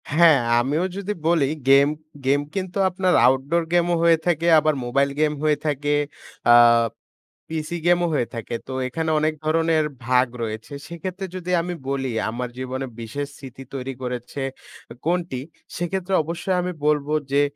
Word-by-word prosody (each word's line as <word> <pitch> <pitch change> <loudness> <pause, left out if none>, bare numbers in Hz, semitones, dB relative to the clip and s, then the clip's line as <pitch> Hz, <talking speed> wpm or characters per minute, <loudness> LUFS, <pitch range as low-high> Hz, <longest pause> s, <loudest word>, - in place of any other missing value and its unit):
হ্যাঁ, 155 -1 +6 0.2
আমিও 145 +8 0
যদি 200 +1 -3
বলি 165 -4 +3 0.2
গেম 140 +1 +7 0.4
গেম 140 +2 +3
কিন্তু 190 -1 -3
আপনার 185 0 +1
Outdoor 135 +6 +1
game 175 0 +3
ও - - +3
হয়ে 165 -1 +6
থাকে, 170 -1 +1
আবার 155 0 +2
মোবাইল 140 +3 +2
গেম 155 -1 +3
হয়ে 150 -1 +3
থাকে, 145 0 0 0.6
আ - - +9 1.0
পিসি 160 +2 -3
গেমও 175 0 +4
হয়ে 125 -5 +1
থাকে। 115 0 -4
তো - - -7 0.2
এখানে 160 +5 -2
অনেক 155 +1 +1
ধরনের 160 0 +2 0.2
ভাগ 125 0 +4 0.2
রয়েছে। 110 +5 -5
সেক্ষেত্রে 185 +3 -5
যদি 180 -1 -4
আমি 175 +1 -4 0.2
বলি 135 -2 -1 0.2
আমার 120 +2 -4
জীবনে 130 +1 -4 0.2
বিশেষ 140 +6 -4
স্মৃতি 135 -1 -10
তৈরি 135 0 -4
করেছে 125 +2 -5 0.6
কোনটি? 170 -6 -1 0.4
সেক্ষেত্রে 185 +2 -2
অবশ্যই 170 +4 -2
আমি 180 +1 -2 0.2
বলব 150 -1 +2 0.2
যে 140 +1 +4
150 Hz, 155 wpm, -23 LUFS, 135-170 Hz, 1.0 s, আ